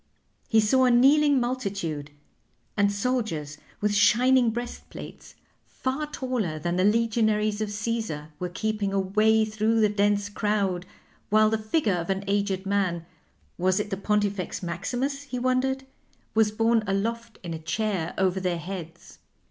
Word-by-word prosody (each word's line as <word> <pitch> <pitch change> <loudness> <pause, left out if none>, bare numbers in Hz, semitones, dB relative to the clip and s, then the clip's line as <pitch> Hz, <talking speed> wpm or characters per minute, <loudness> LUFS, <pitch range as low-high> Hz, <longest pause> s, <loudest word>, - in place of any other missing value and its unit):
He 225 - +4
saw 255 +5 +4
a - - +4
kneeling 280 +3 +5
multitude; 195 - -3 0.7
and 205 -1 +3
soldiers 200 - -2 0.2
with 210 0 +1
shining 235 +4 +4
breastplates, 240 +2 -7 0.3
far 270 +4 -3
taller 250 - -2
than 175 +3 -2
the 185 - +2
legionaries 215 -1 +2
of 215 - -1
Caesar, 210 -8 -3
were 180 - -3
keeping 210 +1 -2
a 195 - +2
way 215 +3 +3
through 215 +1 +1
the 215 -1 +4
dense 205 0 +1
crowd, 200 -4 -1 0.4
while 215 +1 +4
the 220 - +2
figure 215 - +1
of 170 0 -3
an 195 0 -1
aged 200 -1 0
man 190 -4 0 0.5
was 185 +2 +2
it 210 0 -3
the - - 0
Pontifex 205 -2 -1
Maximus, 260 +10 -2
he 275 -3 -6
wondered? 255 +1 0 0.5
was 220 -1 +4
borne 225 +1 +2
aloft 230 +4 -2
in 170 -2 -5
a 160 - -5
chair 175 +1 -2
over 190 0 +1
their 180 -2 -1
heads. 170 -1 -8
210 Hz, 150 wpm, -26 LUFS, 190-230 Hz, 0.7 s, kneeling